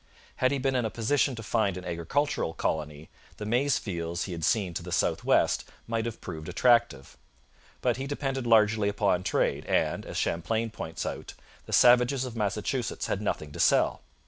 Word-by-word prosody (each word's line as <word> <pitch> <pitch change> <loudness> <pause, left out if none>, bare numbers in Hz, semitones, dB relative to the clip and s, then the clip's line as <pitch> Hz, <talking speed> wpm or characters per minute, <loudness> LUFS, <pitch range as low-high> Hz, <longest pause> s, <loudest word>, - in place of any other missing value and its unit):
Had 130 - +3
he 140 - +1
been 135 0 0
in 125 -2 +1
a 110 - -1
position 130 +4 +1
to 115 - -7
found 110 -4 0
an 90 - -8
agricultural 85 - -1
colony, 75 -1 -3 0.3
the 105 - -6
maize 125 +5 +2
fields 85 -3 -3
he 95 - -6
had 85 -2 -5
seen 100 -4 +1
to - - -4
the - - -8
south - - 0
west - - +2 0.2
might 115 -1 -2
have 115 - -6
proved 80 +1 -7
attractive. 115 - +2 0.6
But 120 -2 +1
he 135 +1 -4
depended 135 -3 -3
largely 105 -2 +4
upon 100 -3 +1
trade, 90 - 0
and, - - +1
as - - -5
Champlain 110 +7 -1
points - - -5
out, - - -6 0.3
the - - -9
savages 125 +2 +5
of 125 -2 -7
Massachusetts 105 +3 -2
had 100 - -2
nothing 75 -7 -3
to - - -9
sell. - - +3
110 Hz, 185 wpm, -28 LUFS, 90-125 Hz, 0.6 s, savages